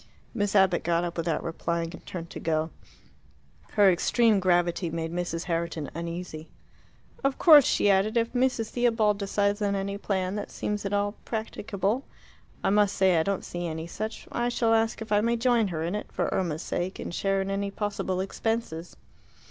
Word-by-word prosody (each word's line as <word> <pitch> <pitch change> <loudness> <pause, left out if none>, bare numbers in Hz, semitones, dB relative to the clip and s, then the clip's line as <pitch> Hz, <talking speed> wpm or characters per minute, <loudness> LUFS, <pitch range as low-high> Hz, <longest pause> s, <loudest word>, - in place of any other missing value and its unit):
Miss 205 -3 -1
Abbott 190 -3 +4
got 170 0 +1
up 175 -1 -3
without 165 -2 -1
replying 170 0 -2
and - - -11
turned 170 -2 -6
to - - -6
go. 160 0 -1 1.0
Her 200 -2 +6
extreme 220 +4 +3
gravity 175 -1 +2
made 165 0 -3
Mrs. 175 -1 -2
Herriton 165 -3 -2
uneasy. 170 -1 -6 0.7
"Of 275 -1 +1
course," 300 -6 +8
she - - +2
added, 200 +4 +2
"if 230 0 +1
Mrs. 250 -3 +1
Theobald 225 -4 +2
decides 200 +1 0
on 200 -1 +1
any 200 +1 -3
plan 190 -2 -1
that 205 - -4
seems 210 -1 -3
at 195 - -2
all 205 0 +1
practicable 220 +1 -2 0.6
I - - +2
must 205 -1 +3
say 190 -2 +4
I 160 - +4
don't 195 +3 -2
see 175 0 -4
any 160 0 -4
such 215 +6 -6
I 240 0 0
shall 230 -2 +2
ask 225 0 +1
if 220 - -14
I 205 0 +4
may 235 +2 +2
join 235 -2 +3
her 165 -4 -3
in 170 +3 -2
it, 210 - -5
for - - -1
Irma's 170 -3 -1
sake, 185 +2 -3
and - - -6
share 195 +2 0
in 195 0 -2
any 200 0 -1
possible 200 -2 -2
expenses." 195 -4 -3
195 Hz, 185 wpm, -27 LUFS, 170-215 Hz, 1.0 s, course